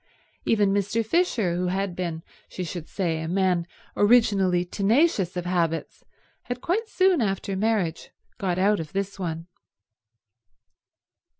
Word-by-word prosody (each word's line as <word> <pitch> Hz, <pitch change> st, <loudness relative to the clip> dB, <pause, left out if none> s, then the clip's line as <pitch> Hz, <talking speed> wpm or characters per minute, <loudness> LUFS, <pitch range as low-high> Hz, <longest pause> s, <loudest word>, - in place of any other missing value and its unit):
Even 205 Hz, -3 st, +3 dB
Mr. 205 Hz, +3 st, 0 dB
Fisher, 225 Hz, -, +1 dB
who 180 Hz, +1 st, -1 dB
had 190 Hz, 0 st, -1 dB
been, 170 Hz, -3 st, -4 dB, 0.3 s
she 185 Hz, -, -5 dB
should 170 Hz, -1 st, -6 dB
say, 165 Hz, -5 st, -1 dB
a 160 Hz, -, -4 dB
man 180 Hz, -1 st, +1 dB, 0.3 s
originally 200 Hz, -5 st, +4 dB
tenacious 200 Hz, -, +1 dB
of 180 Hz, -, -3 dB
habits, 165 Hz, -3 st, -1 dB, 0.4 s
had 245 Hz, 0 st, -4 dB
quite 430 Hz, -, -1 dB
soon 370 Hz, -5 st, +3 dB
after 195 Hz, -2 st, -1 dB
marriage 195 Hz, -5 st, -1 dB, 0.3 s
got 180 Hz, -3 st, -1 dB
out 200 Hz, +2 st, +3 dB
of 160 Hz, -2 st, -7 dB
this 195 Hz, 0 st, -3 dB
one. 165 Hz, -2 st, -4 dB
190 Hz, 130 wpm, -25 LUFS, 175-215 Hz, 0.4 s, originally